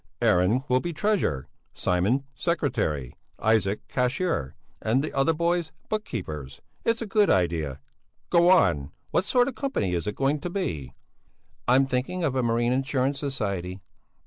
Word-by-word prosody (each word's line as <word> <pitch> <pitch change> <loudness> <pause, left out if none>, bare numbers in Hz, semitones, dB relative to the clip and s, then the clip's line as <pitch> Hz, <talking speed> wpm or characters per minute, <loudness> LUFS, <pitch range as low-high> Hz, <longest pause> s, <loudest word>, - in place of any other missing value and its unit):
Aaron 95 +9 +3
will 125 -1 +3
be 175 +5 -4
treasurer, 165 - 0 0.3
Simon 95 +10 +1
secretary, 125 - -1 0.2
Isaac 110 -2 +1
cashier, 125 - -1 0.3
and 120 +5 +2
the 155 - -4
other 135 +3 +3
boys 170 0 0 0.2
book 215 0 -1
keepers; 75 - -6 0.2
it's 230 0 +1
a - - -4
good 210 0 +3
idea! 85 -6 +1 0.5
Go 175 0 +5
on! 85 - +4 0.2
What 185 - +2
sort 245 +2 +3
of - - -1
a 255 - -17
company 260 - 0
is 85 +2 -2
it 105 - -2
going 140 +2 +1
to 175 - -4
be?" 85 - -3 0.7
"I'm 130 +2 +5
thinking 135 +8 -2
of 140 -5 0
a 130 - +2
marine 120 +1 +1
insurance 135 +1 0
society." 100 -10 -3
130 Hz, 155 wpm, -26 LUFS, -, 0.7 s, Go